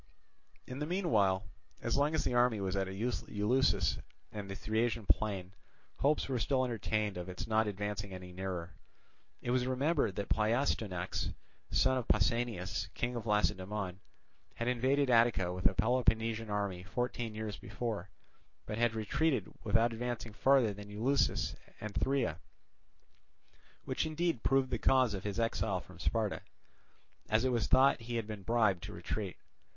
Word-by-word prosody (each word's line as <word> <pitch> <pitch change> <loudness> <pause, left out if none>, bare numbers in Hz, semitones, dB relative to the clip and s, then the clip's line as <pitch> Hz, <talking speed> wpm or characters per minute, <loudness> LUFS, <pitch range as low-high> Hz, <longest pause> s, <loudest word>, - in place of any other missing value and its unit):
In 130 +2 -6
the 150 - -2
meanwhile, 105 - +2 0.4
as - - +1
long 145 +3 +2
as - - +1
the - - 0
army 120 -3 +3
was 95 -1 -1
at 95 -1 0
Eleusis 105 0 +1 0.3
and 105 -2 -6
the 95 - -4
Thriasian 110 +1 0
plain, 95 -4 +1 0.5
hopes 145 +3 +2
were 130 -3 -1
still 130 +1 +2
entertained 110 -4 -1
of 90 +1 -5
its 90 - -5
not 110 0 +2
advancing 105 0 -3
any 90 -1 -8
nearer. 90 -2 -4 0.7
It 120 - -1
was 125 0 +2
remembered 135 - +1
that 100 - -3
Pleistoanax, 110 -5 0 0.4
son 130 0 +3
of 120 - -6
Pausanias, 105 -3 0
king 120 +1 -1
of 115 -1 -4
Lacedaemon, 100 -2 0 0.6
had 115 - -3
invaded 130 +2 +2
Attica 115 -7 +4
with 90 0 +3
a 95 - -1
Peloponnesian 115 -1 +1
army 100 -3 -1
fourteen 115 +3 -3
years 110 -1 -4
before, 105 -6 -4 0.6
but 105 - -4
had 120 -1 +2
retreated 150 +7 0
without 115 +1 +3
advancing 120 -1 -4
farther 130 -2 +4
than 105 +1 -10
Eleusis 120 +7 +1 0.2
and 105 -1 -5
Thria, 125 - 0 1.5
which - - -1
indeed 160 -4 0
proved 135 -1 +2
the 120 - 0
cause 130 -4 +4
of 100 0 -5
his 105 +2 -2
exile 110 -4 0
from 95 0 -14
Sparta, 110 +2 0 0.9
as 110 +3 +3
it - - +3
was 120 -2 +1
thought 130 -1 +5
he 120 +1 -5
had 115 -2 -1
been 105 -2 -6
bribed 105 -4 +2
to - - -7
retreat. 100 -4 -4
110 Hz, 155 wpm, -33 LUFS, 100-125 Hz, 1.5 s, thought